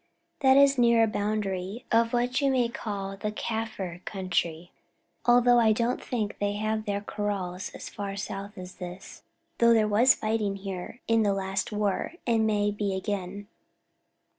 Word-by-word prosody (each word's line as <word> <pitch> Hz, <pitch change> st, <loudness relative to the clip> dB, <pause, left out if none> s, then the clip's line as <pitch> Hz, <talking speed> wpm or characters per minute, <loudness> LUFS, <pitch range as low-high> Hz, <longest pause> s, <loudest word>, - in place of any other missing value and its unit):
"This 275 Hz, +1 st, +6 dB
is 275 Hz, -, -7 dB
near 235 Hz, -1 st, +5 dB
the 215 Hz, -, -3 dB
boundary 205 Hz, +1 st, -2 dB
of 230 Hz, 0 st, +3 dB
what 245 Hz, +3 st, +1 dB
you 280 Hz, -, +3 dB
may 250 Hz, -3 st, +2 dB
call 200 Hz, -5 st, -5 dB
the 210 Hz, +2 st, -3 dB
Kaffir 210 Hz, -5 st, -4 dB
country, 180 Hz, -3 st, -2 dB, 0.6 s
although 245 Hz, 0 st, +6 dB
I 220 Hz, -2 st, +5 dB
don't 235 Hz, +3 st, 0 dB
think 220 Hz, -5 st, -3 dB
they 205 Hz, 0 st, 0 dB
have 215 Hz, +1 st, -2 dB
their 200 Hz, 0 st, -1 dB
kraals 200 Hz, -2 st, -3 dB
as -, -, -8 dB
far 200 Hz, -2 st, -5 dB
south 200 Hz, +1 st, -6 dB
as 185 Hz, 0 st, -9 dB
this, 180 Hz, +1 st, -9 dB, 0.4 s
though 235 Hz, 0 st, +6 dB
there 215 Hz, -1 st, +3 dB
was 230 Hz, +5 st, +5 dB
fighting 215 Hz, -2 st, -1 dB
here 195 Hz, +3 st, -7 dB
in 225 Hz, 0 st, +3 dB
the 200 Hz, -2 st, +2 dB
last 195 Hz, +1 st, -2 dB
war, 210 Hz, -, -1 dB
and 225 Hz, -2 st, +2 dB
may 205 Hz, -1 st, +1 dB
be 205 Hz, -2 st, -2 dB
again." 200 Hz, 0 st, -4 dB
210 Hz, 165 wpm, -27 LUFS, 195-230 Hz, 0.6 s, This